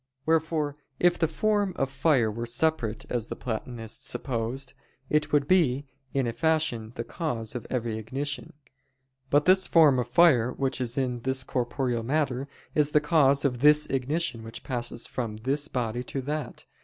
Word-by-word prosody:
Wherefore 160 -2 +1 0.2
if 175 0 +3
the 165 - +3
form 205 +3 0
of 135 - 0
fire 130 -5 +2
were 115 +2 -5
separate, 120 -3 0
as 120 -2 -1
the - - -5
Platonists 115 -1 -4
supposed, 125 +2 -3 0.4
it 150 0 +1
would 145 -1 +2
be, 145 -7 +3 0.3
in 135 -2 0
a 115 - -2
fashion, 155 -8 0
the 115 - -3
cause 115 -5 -4
of 125 - -6
every 115 -3 -2
ignition. 140 +8 -4 0.8
But 145 +1 +3
this 190 +1 +5
form 150 -6 +5
of 120 - -1
fire 125 -4 +5
which 135 -1 -2
is 125 +1 -2
in 125 -2 0
this 130 +2 -1
corporeal 125 -1 -1
matter, 135 +1 -1 0.3
is 150 -1 +3
the 150 - +4
cause 145 -2 +3
of 125 -3 0
this 150 +2 +5
ignition 135 -1 -1
which 115 +1 -9
passes 120 -2 -4
from 115 -4 -4
this 140 +6 0
body 120 -4 -2
to 135 - -3
that. 150 +3 -5
135 Hz, 165 wpm, -27 LUFS, 120-150 Hz, 0.8 s, this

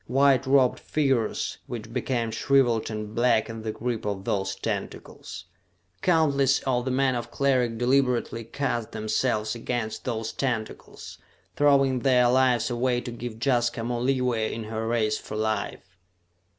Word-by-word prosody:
White 135 0 +3
robed 130 -2 +4
figures 135 -7 -1
which 115 -1 -7
became 120 -2 -1
shriveled 120 -1 +2
and 105 -1 -5
black 115 -2 +2
in 115 0 -7
the 110 0 -3
grip 115 +1 -3
of 100 -2 -3
those 95 0 -1
tentacles. 95 - -6 0.6
Countless 140 -6 +3
of 125 -2 0
the - - -1
men 130 0 +2
of 120 -1 -4
Cleric 125 -3 +1
deliberately 125 -2 +1
cast 120 -1 -3
themselves 110 0 -1
against 120 -1 -4
those 115 -2 -3
tentacles, 115 -5 -4 0.4
throwing 135 -3 +3
their 125 -1 +4
lives 125 -2 +3
away 120 +1 +1
to 120 - -6
give 120 -1 -7
Jaska 120 -3 +1
more 120 0 -2
leeway 125 -4 0
in 115 - -5
her 110 +1 -4
race 115 -2 +1
for - - -8
life. 110 -3 -3
120 Hz, 145 wpm, -26 LUFS, 110-130 Hz, 0.6 s, robed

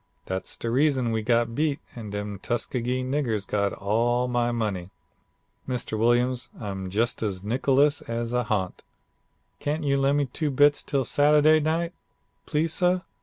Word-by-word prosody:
Dat's 95 0 -4
de 115 - -3
reason 130 -2 +2
we 110 -1 0
got 115 +1 +1
beat 150 +1 0 0.2
and 110 -4 -7
dem 105 -1 -4
Tuskegee 125 +3 -2
niggers 130 -6 -1
got 100 -1 0
all 120 +5 0
my 120 -1 +1
money. 105 -6 -2 0.8
Mr. 125 -3 -2
Williams, 120 +2 +2
I'm 95 -3 -5
jus' 115 +5 0
as 100 -4 -2
nickless 135 +7 +2
as 115 0 -2
a 125 -1 +1
ha'nt. 95 -4 -2 0.8
Can't 150 +2 -2
you 140 -1 +2
lem' 140 +1 +2
me 145 - +2
two 150 +4 -2
bits 145 +1 +4
til' 135 -2 -1
Sadday 150 +3 +5
night, 165 +3 -1 0.5
please 160 +1 0
suh? 180 0 +2
120 Hz, 155 wpm, -26 LUFS, 110-145 Hz, 0.8 s, Sadday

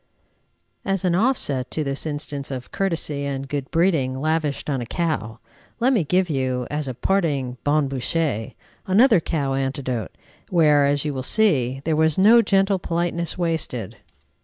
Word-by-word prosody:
As 195 -1 -1
an 180 - +2
offset 175 - +1
to 155 - -2
this 140 +2 -3
instance 145 -2 -5
of 130 -2 -6
courtesy 160 -7 -1
and 135 -1 -4
good 140 -1 -4
breeding 160 -7 +1
lavished 155 -1 -1
on 135 -4 -1
a - - -4
cow, 155 - -2 0.4
let 255 +3 +3
me 210 -9 +2
give 180 +4 +1
you, 130 -4 -1
as 150 -1 -2
a 130 - -4
parting 140 -8 0
bon 145 0 +2
bouche, 135 -3 -2 0.3
another 215 +2 +5
cow 145 -4 -2
anecdote, 135 -4 -2 0.4
where, 150 -5 +4
as 145 +1 +1
you 150 - -1
will 130 - -3
see, 135 - +2
there 160 -1 +1
was 160 0 +2
no 220 +5 +7
gentle 195 -2 +2
politeness 170 0 -2
wasted. 160 - -2
150 Hz, 160 wpm, -22 LUFS, 135-175 Hz, 0.4 s, no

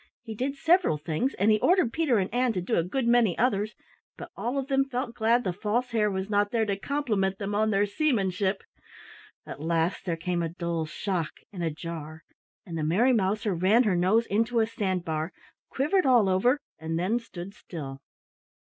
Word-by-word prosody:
He 225 -2 -6
did 260 +6 -2
several 335 - +3
things 160 - -2
and 205 +3 +3
he 215 - +3
ordered 355 - +3
Peter 310 -8 +2
and 195 +1 -1
Ann 245 -1 +2
to 185 - -2
do 180 - -1
a - - +3
good 235 +9 -2
many 235 -6 +3
others, 215 -3 +1 0.4
but - - -9
all 245 +4 -2
of 270 - -1
them 270 0 +2
felt 250 -2 -3
glad 235 +2 +2
the 185 - -1
False 225 +6 -1
Hare 215 -2 +2
was 190 -1 -3
not 205 -1 +1
there 225 -1 +1
to 200 -2 -1
compliment 205 -6 -1
them 205 0 -4
on 215 +1 +2
their 205 -1 +2
seamanship. 200 - 0 0.8
At - - -8
last 165 +3 0
there 170 -3 -1
came 175 +1 -2
a 165 - -1
dull 170 -2 -3
shock 170 -1 -3 0.2
and 180 -3 -4
a 165 - +1
jar, 160 0 -7 0.4
and 170 -4 -7
the - - -1
Merry 215 +12 +3
Mouser 210 -1 +1
ran 190 +8 +4
her 205 -6 +2
nose 190 +7 +3
into 230 +3 +1
a 220 - +4
sand 190 -5 -2
bar, 160 +2 -3 0.4
quivered 300 +4 +1
all 240 -6 +5
over, 240 +9 +3 0.2
and 160 +1 -3
then 195 +8 +1
stood 195 -4 -9
still. 140 -9 -8
205 Hz, 200 wpm, -27 LUFS, 175-240 Hz, 0.8 s, all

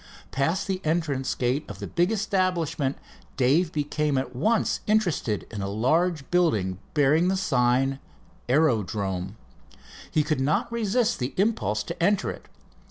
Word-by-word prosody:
Past 165 +8 0
the 190 -1 -2
entrance 155 -5 0
gates 130 +5 -1
of 105 - -7
the 100 - -6
big 175 - +1
establishment, 185 -9 0 0.4
Dave 145 +7 +3
became 150 -1 -1
at 130 -1 -3
once 215 - +1
interested 180 - +1
in 105 -3 -5
a 100 - -2
large 150 - 0
building 105 - +1 0.2
bearing 150 +4 +4
the 190 +1 +1
sign 135 -5 +1 0.5
"Aerodrome." 105 - 0 0.7
He 155 - +2
could 150 -3 -1
not 145 - +1
resist 235 +1 +1
the 125 +1 -3
impulse 110 - +1
to 170 +7 -7
enter 200 +3 +2
it. - - -11
150 Hz, 140 wpm, -26 LUFS, 125-180 Hz, 0.7 s, bearing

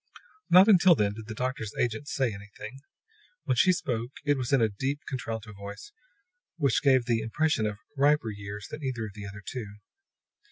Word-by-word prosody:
Not 185 +3 +8
until 185 -4 +7
then 100 -5 +1
did 110 0 -9
the 110 - -6
doctor's 125 -4 -3
agent 120 +4 -1
say 130 -7 0
anything. 105 +5 -10 0.6
When - - +1
she 185 - +5
spoke 120 -9 -2 0.2
it 145 0 +3
was 130 -1 -3
in 135 - +5
a 115 - +4
deep, 135 +8 -3
contralto 115 -5 -5
voice 100 - -9 0.7
which 140 -6 +2
gave 130 -4 +4
the 115 -2 +1
impression 115 0 +1
of 105 -1 -4 0.2
riper 140 -4 +3
years 100 0 -7
than 150 - -6
either 125 -4 -2
of 105 - -8
the 105 0 -8
other 105 0 -10
two. 105 -6 -6
115 Hz, 185 wpm, -28 LUFS, 105-140 Hz, 0.7 s, Not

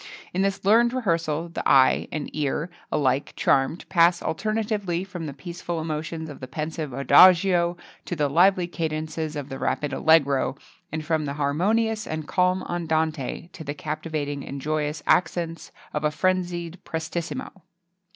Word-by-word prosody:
[XXII - - -12
48] - - -18
In 185 - 0
this 195 0 -1
learned 235 +4 +5
rehearsal 165 -8 -1
the 165 - -2
eye 130 -1 +5
and 155 -2 -3
ear, 150 +3 -1 0.2
alike 140 -1 +1
charmed, 135 +5 +1
pass 170 -1 +4
alternately 205 -2 -1
from 180 -4 -6
the - - -4
peaceful 170 +3 -5
emotions 160 +1 -4
of 145 - -9
the 130 - -7
pensive 155 +2 -4
adagio 175 +5 +5 0.3
to 175 - -3
the 150 -2 +1
lively 180 +5 +4
cadences 155 -2 -3
of 145 -2 -5
the 135 - -6
rapid 145 -2 -1
allegro, 140 -4 +3 0.4
and 155 0 -4
from 160 -2 0
the 140 - -3
harmonious 210 +10 0
and 155 -1 -4
calm 180 0 +2
andante 160 -2 -2
to 160 - -8
the 145 0 -5
captivating 150 -2 -4
and 140 - -6
joyous 150 +1 -2
accents 170 -1 0 0.2
of 150 - -2
a 150 - +3
frenzied 175 0 -1
prestissimo. 170 +6 -5
160 Hz, 155 wpm, -25 LUFS, 150-180 Hz, 0.4 s, learned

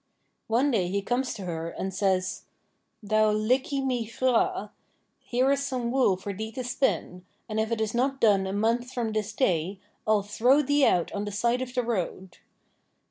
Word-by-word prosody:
One 250 +6 +2
day 195 -7 +1
he 200 +2 -1
comes 250 +3 -1
to 200 - -7
her, 165 -1 -4
and 190 +2 -5
says: 190 -1 0 0.6
'Thou 215 +1 +3
liggey 255 +6 +1
my 245 -4 -1
hraa, 230 -4 +1 0.5
here 255 +3 +1
is 280 0 +1
some 250 -4 -2
wool 250 -8 +3
for 200 +2 -5
thee 220 +3 -5
to 255 - -4
spin, 240 -7 -1 0.2
and 215 -1 -2
if 220 +1 -1
it 230 - 0
is 220 -1 -1
not 265 +3 0
done 200 -5 +4
a - - -3
month 230 +5 0
from 235 -3 -2
this 215 -1 -2
day, 190 - 0 0.3
I'll 215 -2 +3
throw 245 +8 +3
thee 285 0 +3
out 175 -2 +1
on 205 0 -3
the 205 - -4
side 235 +5 +1
of 255 0 -5
the 250 - +1
road. 190 -5 -3
220 Hz, 190 wpm, -27 LUFS, 200-250 Hz, 0.6 s, done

